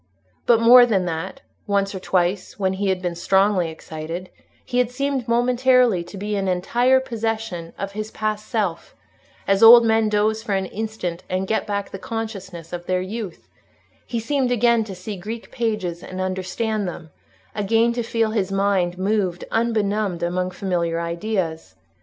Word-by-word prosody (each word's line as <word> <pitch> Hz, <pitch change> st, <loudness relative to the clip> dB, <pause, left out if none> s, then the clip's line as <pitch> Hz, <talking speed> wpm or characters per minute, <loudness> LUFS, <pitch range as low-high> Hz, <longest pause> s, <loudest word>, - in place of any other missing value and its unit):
But 235 Hz, -2 st, +6 dB
more 245 Hz, +2 st, +8 dB
than 195 Hz, -6 st, +1 dB
that—once 195 Hz, +3 st, -3 dB
or 190 Hz, -, -5 dB
twice, 185 Hz, +1 st, -1 dB
when 190 Hz, -2 st, 0 dB
he 195 Hz, +1 st, -1 dB
had 185 Hz, -1 st, -1 dB
been 175 Hz, -1 st, -1 dB
strongly 190 Hz, 0 st, +2 dB
excited, 160 Hz, +3 st, -7 dB, 0.3 s
he 250 Hz, -1 st, -1 dB
had 250 Hz, -2 st, +2 dB
seemed 270 Hz, -1 st, -2 dB
momentarily 245 Hz, -4 st, +3 dB
to 195 Hz, -, -10 dB
be 205 Hz, +2 st, -3 dB
in 195 Hz, -1 st, -1 dB
entire 240 Hz, +8 st, +3 dB
possession 225 Hz, -8 st, -3 dB
of 195 Hz, 0 st, -4 dB
his 215 Hz, +1 st, -5 dB
past 215 Hz, -1 st, -3 dB
self, 200 Hz, -8 st, -2 dB, 0.5 s
as 195 Hz, 0 st, +2 dB
old 230 Hz, +1 st, +10 dB
men 220 Hz, -1 st, +3 dB
doze 215 Hz, +1 st, +1 dB
for 210 Hz, -3 st, -2 dB
an 190 Hz, 0 st, 0 dB
instant 195 Hz, -4 st, -4 dB
and 185 Hz, +1 st, -1 dB
get 220 Hz, +3 st, -1 dB
back 200 Hz, -1 st, -3 dB
the 195 Hz, -, -7 dB
consciousness 195 Hz, -8 st, -6 dB
of 175 Hz, 0 st, -6 dB
their 185 Hz, 0 st, +1 dB
youth: 200 Hz, -1 st, -6 dB, 0.6 s
he 235 Hz, -, -2 dB
seemed 255 Hz, +2 st, 0 dB
again 235 Hz, -1 st, +3 dB
to 195 Hz, -3 st, -7 dB
see 195 Hz, +3 st, -6 dB
Greek 220 Hz, +5 st, -7 dB
pages 215 Hz, -8 st, -2 dB
and 185 Hz, 0 st, -7 dB
understand 190 Hz, +3 st, -2 dB
them, 160 Hz, -2 st, -8 dB, 0.4 s
again 225 Hz, +3 st, +2 dB
to 240 Hz, -, -2 dB
feel 225 Hz, -1 st, 0 dB
his 200 Hz, -3 st, -1 dB
mind 195 Hz, -3 st, +1 dB
moving 190 Hz, -2 st, -1 dB
unbenumbed 215 Hz, -5 st, 0 dB
among 180 Hz, +1 st, -1 dB
familiar 175 Hz, -3 st, -1 dB
ideas. 170 Hz, -, -3 dB
200 Hz, 165 wpm, -22 LUFS, 185-225 Hz, 0.6 s, old